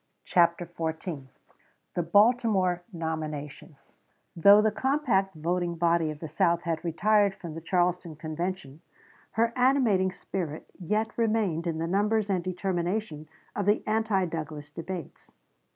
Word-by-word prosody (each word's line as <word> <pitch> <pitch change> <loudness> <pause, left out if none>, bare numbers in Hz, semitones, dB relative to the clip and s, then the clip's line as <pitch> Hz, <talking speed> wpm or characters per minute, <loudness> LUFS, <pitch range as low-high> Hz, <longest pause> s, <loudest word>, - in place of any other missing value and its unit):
CHAPTER 170 0 +2
XIV 160 -3 -5 0.7
THE 175 - 0
BALTIMORE 200 -1 +3
NOMINATIONS 155 -3 -6 0.4
Though 200 +4 +7
the 215 0 +3
compact 230 - +1
voting 170 +2 -1
body 170 -1 +2
of 155 - -5
the 160 - -4
South 170 +2 +1
had 165 -2 -2
retired 200 +4 +2
from 170 -4 -8
the 165 - -7
Charleston 175 -1 0
Convention, 155 -1 -5 0.5
her 230 +1 +1
animating 245 -8 +3
spirit 170 -4 -5
yet 215 +5 -1
remained 210 -7 +1
in 165 -2 -1
the 165 - -2
numbers 205 +3 +1
and 180 -2 0
determination 180 -2 -2 0.3
of 205 -1 -2
the 210 - +3
anti 215 -3 +1
Douglas 155 -3 -6
delegates. 170 +1 -8
175 Hz, 130 wpm, -28 LUFS, 165-205 Hz, 0.7 s, Though